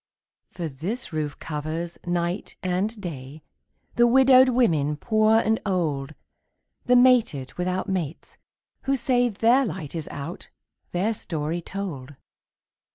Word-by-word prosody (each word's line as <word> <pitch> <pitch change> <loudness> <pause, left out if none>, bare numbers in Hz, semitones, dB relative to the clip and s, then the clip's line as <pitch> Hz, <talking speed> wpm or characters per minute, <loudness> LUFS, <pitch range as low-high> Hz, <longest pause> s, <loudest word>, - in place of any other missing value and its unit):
For 170 -2 -5
this 170 - -5
roof 150 -2 -3
covers, 160 +3 -5
night 175 +2 -2
and 190 +5 -1
day, 150 -5 -8 0.5
The 240 0 +6
widowed 260 +1 +6
women 160 - +2
poor 215 +4 +3
and 220 0 +1
old, 155 -7 -1 0.7
The 250 - +4
mated 245 - +4
without 180 +1 -2
mates, 175 -5 -4 0.5
who 275 0 +2
say 245 0 +2
Their 235 +5 +3
light 185 - -5
is 160 -3 -5
out, 155 +5 -7 0.4
their 195 +6 0
story 165 -4 -3
told. 160 -9 -6
180 Hz, 120 wpm, -25 LUFS, 155-225 Hz, 0.7 s, The